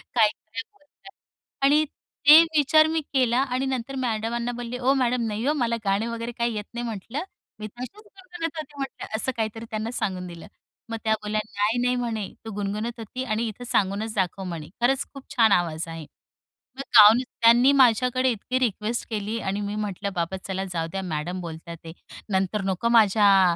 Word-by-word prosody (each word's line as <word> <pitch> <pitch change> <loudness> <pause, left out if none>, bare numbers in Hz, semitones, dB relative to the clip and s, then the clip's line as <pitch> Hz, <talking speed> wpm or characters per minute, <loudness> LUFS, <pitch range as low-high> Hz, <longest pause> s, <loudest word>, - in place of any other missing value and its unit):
काय, 225 -3 +6
काय 220 +2 -8
बोलतात. 390 +1 -19 0.5
आणि 295 +2 +5 0.4
ते 305 +3 +11 0.2
विचार 310 +2 +5
मी 320 0 0
केला 250 -3 +3
आणि 260 0 -1
नंतर 265 0 -3
मॅडमांना 235 +1 -2
बोलले, 240 0 -5
"ओ, 260 +2 +3
मॅडम 250 -2 +1
नाही 215 +2 -3
हो, 295 - +3
मला 240 -6 0
गाणे 200 +3 +1
वगैरे 230 0 -4
काही 235 -1 -2
येत 210 -1 -4
नाही" 240 0 -4
म्हंटलं, 230 - -5 0.4
"मी 215 - -5
तशीच 245 - -9
गुणगुणत 360 -6 -7
होती" 305 -2 -7
म्हटलं. 270 -5 -5
असं 245 +4 -1
काहीतरी 225 +1 -3
त्यांना 220 +1 -3
सांगून 185 -5 -3
दिलं. 170 -2 -10 0.4
मग 225 - -3
त्या 220 - +2
बोलल्या, 210 +1 -1 0.2
"नाही, 210 +3 +2
नाही" 250 0 +2
म्हणे, 230 -5 -2 0.2
"तू 225 - -5
गुणगुणत 210 +4 -3
होती 240 +4 -5
आणि 230 -1 -1
इथं 220 +3 -7
सांगूनच 210 +1 0
दाखव" 190 0 -1
म्हणे, 170 -4 -6
"खरंच 265 +2 +2
खूप 275 -1 -10
छान 225 -4 +5
आवाज 170 -3 +1
आहे." 165 -1 -7 0.7
मग 275 - -4 0.2
गाऊन 215 +3 +9
त्यांनी 240 +2 +4
माझ्याकडे 250 +2 +3
इतकी 250 +4 -2
रिक्वेस्ट 230 -1 -1
केली 215 0 -3
आणि 195 -1 -2
मी 205 0 -3
म्हटलं 205 -1 -3
बाबा 175 +2 -2
चला 190 0 -2
जाऊ 165 -1 -1
द्या 195 - -3
मॅडम 170 +5 -3
बोलता 165 -1 -8
आहेत. 165 -1 -9 0.4
नंतर 190 +2 0
नको 190 +4 0
माझ्या 200 -5 +5
225 Hz, 185 wpm, -25 LUFS, 200-250 Hz, 0.7 s, ते